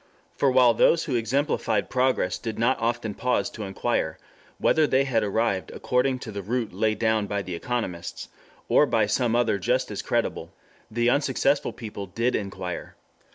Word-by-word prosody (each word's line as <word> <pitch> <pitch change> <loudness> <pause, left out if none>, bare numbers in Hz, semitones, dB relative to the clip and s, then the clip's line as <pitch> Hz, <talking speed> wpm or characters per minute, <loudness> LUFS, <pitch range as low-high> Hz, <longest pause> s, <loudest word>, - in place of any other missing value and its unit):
For 140 - +2
while 125 -2 +5
those 165 +8 +4
who 140 - -3
exemplified 115 -2 0
progress 125 -8 +1
did 115 -2 -5
not 120 +3 +2
often 115 -2 -1
pause 125 +4 0
to 110 - -9
inquire 95 0 -1 0.4
whether 155 -1 +3
they 135 0 +3
had 125 -5 +1
arrived 105 -2 0
according 130 +1 0
to 110 - -6
the 100 -1 -5
route 115 +2 -2
laid 110 +3 0
down 110 -2 +1
by 100 0 -2
the 90 - -6
economists, 90 -2 -4 0.4
or 150 - +4
by 110 -4 +2
some 115 +2 +1
other 120 -4 +2
just 125 +6 0
as 105 - -3
creditable, - - -1 0.4
the 120 +2 +2
unsuccessful 140 +1 +1
people 105 -3 -7
did 115 +7 0
inquire. 95 -3 -5
115 Hz, 165 wpm, -25 LUFS, 100-125 Hz, 0.4 s, while